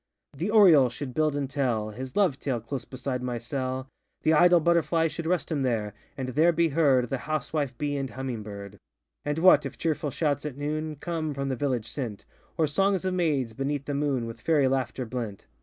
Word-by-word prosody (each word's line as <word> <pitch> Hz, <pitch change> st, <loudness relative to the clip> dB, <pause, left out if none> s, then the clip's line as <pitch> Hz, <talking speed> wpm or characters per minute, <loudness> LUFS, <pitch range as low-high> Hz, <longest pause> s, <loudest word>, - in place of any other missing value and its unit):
The 170 Hz, +9 st, -2 dB
oriole 175 Hz, -, +7 dB
should 130 Hz, +1 st, -6 dB
build 155 Hz, 0 st, +1 dB
and 140 Hz, -1 st, -1 dB
tell 120 Hz, -6 st, -1 dB
His 130 Hz, +4 st, -7 dB
love 185 Hz, -10 st, +2 dB
tale, 130 Hz, -4 st, -1 dB
close 120 Hz, +2 st, -5 dB
beside 130 Hz, -1 st, -4 dB
my 125 Hz, -1 st, -2 dB
cell; 130 Hz, +2 st, -3 dB, 0.4 s
The 160 Hz, -, +4 dB
idle 175 Hz, +2 st, +6 dB
butterfly 165 Hz, 0 st, +2 dB
Should 160 Hz, +1 st, -5 dB
rest 170 Hz, -5 st, 0 dB
him 150 Hz, -3 st, 0 dB
there, 110 Hz, -5 st, -1 dB, 0.2 s
and 130 Hz, -2 st, -3 dB
there 155 Hz, +7 st, +4 dB
be 170 Hz, 0 st, +2 dB
heard 135 Hz, -5 st, +3 dB
The 135 Hz, -, -1 dB
housewife 145 Hz, -3 st, -2 dB
bee 145 Hz, +1 st, -1 dB
and 135 Hz, -1 st, -3 dB
humming 130 Hz, -4 st, -4 dB
bird. 100 Hz, -1 st, -9 dB, 0.4 s
And 145 Hz, +1 st, -2 dB
what, 185 Hz, +3 st, +6 dB
if -, -, -6 dB
cheerful 155 Hz, -2 st, -1 dB
shouts 145 Hz, 0 st, -1 dB
at 150 Hz, -3 st, -5 dB
noon, 155 Hz, +2 st, -3 dB
Come, 155 Hz, 0 st, -3 dB
from 140 Hz, 0 st, -2 dB
the 130 Hz, -, 0 dB
village 125 Hz, -4 st, -1 dB
sent, 120 Hz, -8 st, -5 dB, 0.3 s
Or 160 Hz, -, +3 dB
songs 190 Hz, +5 st, +1 dB
of 185 Hz, -, 0 dB
maids, 145 Hz, -10 st, 0 dB
beneath 140 Hz, +3 st, -2 dB
the 145 Hz, -, -3 dB
moon, 140 Hz, -4 st, 0 dB
With 115 Hz, 0 st, -8 dB
fairy 150 Hz, -3 st, +3 dB
laughter 130 Hz, -1 st, -1 dB
blent? 115 Hz, -4 st, -5 dB
140 Hz, 205 wpm, -27 LUFS, 125-155 Hz, 0.4 s, oriole